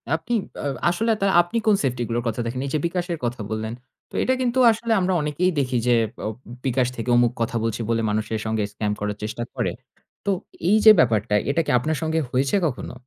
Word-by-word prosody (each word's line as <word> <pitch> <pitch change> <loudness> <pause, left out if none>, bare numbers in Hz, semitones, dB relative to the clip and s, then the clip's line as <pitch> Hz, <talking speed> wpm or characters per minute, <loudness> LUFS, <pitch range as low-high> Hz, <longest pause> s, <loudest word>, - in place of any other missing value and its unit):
আপনি 165 +9 -4 0.3
আ - - -1 0.2
আসলে 225 +6 +1
তা - - +2 0.2
আপনি 175 +7 -4
কোন 210 - +6
safety 125 -2 -1
গুলোর 120 +1 -1
কথা 115 +1 -1
দেখেন? 125 +2 -3
এই - - -5
যে - - +2
বিকাশের 175 -1 -3
কথা 120 -2 -3
বললেন, 110 +1 -3 0.4
তো - - -30
এটা 260 - +2
কিন্তু 250 +1 +1
আসলে 225 +1 -3
আমরা 185 0 +1
অনেকেই 150 +5 0
দেখি 130 -2 0
যে 120 - +5 0.3
ও - - -1 0.4
বিকাশ 130 -1 +2
থেকে 115 +1 -4
অমুক 120 -1 +4
কথা 115 +1 -1
বলছে 115 0 -2
বলে 115 -1 +1
মানুষের 110 +1 -1
সঙ্গে 110 -1 0
scam 105 0 -2
করার 105 0 -3
চেষ্টা 110 +2 -3
করে। - - 0 0.5
তো - - 0 0.4
এই 215 - +5
যে 215 - +12
ব্যাপারটা, 110 -3 +2 0.2
এটা 165 +4 +2
কি - - 0
আপনার 155 +4 -1
সঙ্গে 160 0 0
হয়েছে 135 +6 +1
কখনো? 140 -5 -3
125 Hz, 210 wpm, -23 LUFS, 115-175 Hz, 0.5 s, যে